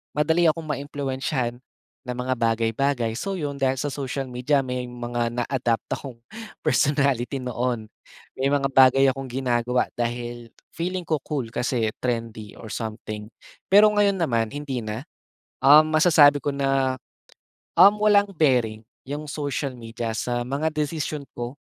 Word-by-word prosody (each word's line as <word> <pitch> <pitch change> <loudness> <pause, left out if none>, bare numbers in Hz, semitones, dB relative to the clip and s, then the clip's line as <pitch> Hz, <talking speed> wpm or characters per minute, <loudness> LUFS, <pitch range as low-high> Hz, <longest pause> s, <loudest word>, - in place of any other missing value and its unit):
madali 160 +3 +2
akong 165 +1 -2
maimpluwensyahan, 135 -3 -3 0.5
ng 125 - -3
mga 130 0 0
bagay-bagay. 115 +1 0
So 195 -1 -3
'yon, 145 -4 -4
dahil 135 -1 +2
sa 140 +2 -3
social 135 0 -4
media 135 +3 +1
may 125 -1 -4
mga 120 -1 -3 0.2
na-adapt 120 -3 -1
akong 135 -4 -4 0.5
personality 140 -3 +1
noon, 120 -2 -2 0.4
may 135 - 0
mga 140 -1 +1
bagay 135 0 +6
akong 135 0 -7
ginagawa 125 -1 0
dahil 120 0 -4 0.2
feeling 180 +2 -3
ko 155 -2 -1
cool 135 -7 -3
kasi 120 -2 -1
trendy 115 -4 -4
or 110 - -10
something. 110 -1 -5 0.4
Pero 210 +2 +7
ngayon 205 -1 +3
naman 115 -9 +1
hindi 145 -3 -3
na, 110 +3 -5 0.6
um, 150 +3 +9
masasabi 155 -3 +6
ko 145 -1 -1
na, 135 -1 +1 0.8
um, 195 +4 +8
walang 205 -1 +4
bearing 120 -8 +2 0.3
'yong 150 +2 -4
social 140 -2 -3
media 115 -1 -5
sa 120 +2 -2
mga 145 +5 -1
desisyon 150 -1 -3
ko, 120 +4 -6
130 Hz, 140 wpm, -24 LUFS, 120-145 Hz, 0.8 s, um